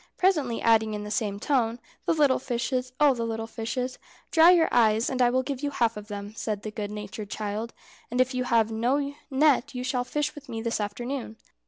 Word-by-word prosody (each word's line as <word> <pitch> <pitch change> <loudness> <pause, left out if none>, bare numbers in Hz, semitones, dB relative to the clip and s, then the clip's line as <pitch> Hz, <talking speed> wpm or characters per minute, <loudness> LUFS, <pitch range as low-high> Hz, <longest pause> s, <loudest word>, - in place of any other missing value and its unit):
presently 300 -11 +2
adding 220 -1 +3
in 210 - -5
the 210 - -6
same 205 -2 -1
tone, 235 -2 +1 0.3
"The - - +4
little 290 -4 +4
fishes! 255 0 -2
Oh, 295 -2 +6
the 235 -2 -3
little 225 -1 -3
fishes!" 250 +3 -4 0.3
"Dry 325 +1 +7
your 345 -3 +6
eyes, 225 0 +3
and 255 -1 -1
I 245 - +5
will 260 +1 +1
give 275 -1 -4
you 290 - -1
half 235 -5 +1
of 210 0 -8
them," 205 0 -6
said 210 -2 -3
the 215 - -5
good 210 -1 -4
natured 210 0 -7
child; 215 +2 -4 0.4
"and 245 - -2
if 255 +1 +3
you 255 0 -1
have 230 -3 +2
no 270 +6 0 0.2
net 275 -2 +3
you 250 - -3
shall 255 -1 0
fish 295 +4 -2
with 290 -1 -12
me 225 - -4
this 230 -1 -1
afternoon." 230 +2 -4
240 Hz, 215 wpm, -27 LUFS, 220-265 Hz, 0.4 s, Dry